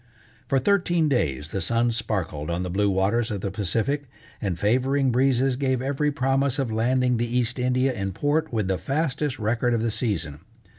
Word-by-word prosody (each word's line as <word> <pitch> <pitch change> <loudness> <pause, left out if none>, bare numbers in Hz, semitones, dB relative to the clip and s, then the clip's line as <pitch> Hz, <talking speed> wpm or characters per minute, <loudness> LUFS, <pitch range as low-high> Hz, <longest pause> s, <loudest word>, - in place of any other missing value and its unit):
For 135 - +2
thirteen 175 0 +2
days 75 - 0
the 95 - -2
sun 115 +6 +1
sparkled 95 -10 -3
on 85 +2 -1
the 90 - -4
blue 100 +2 +2
waters 100 +5 +1
of 100 -3 -3
the 100 - -3
Pacific, 115 - -1 0.3
and 95 -5 -2
favoring 130 +6 +2
breezes 130 +1 +2
gave 130 -1 0
every 140 +3 0
promise 135 0 +1
of 135 -5 -1
landing 125 +2 +2
the 120 +1 -1
East 125 +1 -1
India 130 +1 +1
in 100 -4 -3
port 150 - 0
with 110 -5 -1
the 95 -1 0
fastest 145 -1 -1
record 120 +2 0
of 115 - -1
the 115 - 0
season. 95 - -2
120 Hz, 185 wpm, -25 LUFS, 100-135 Hz, 0.3 s, For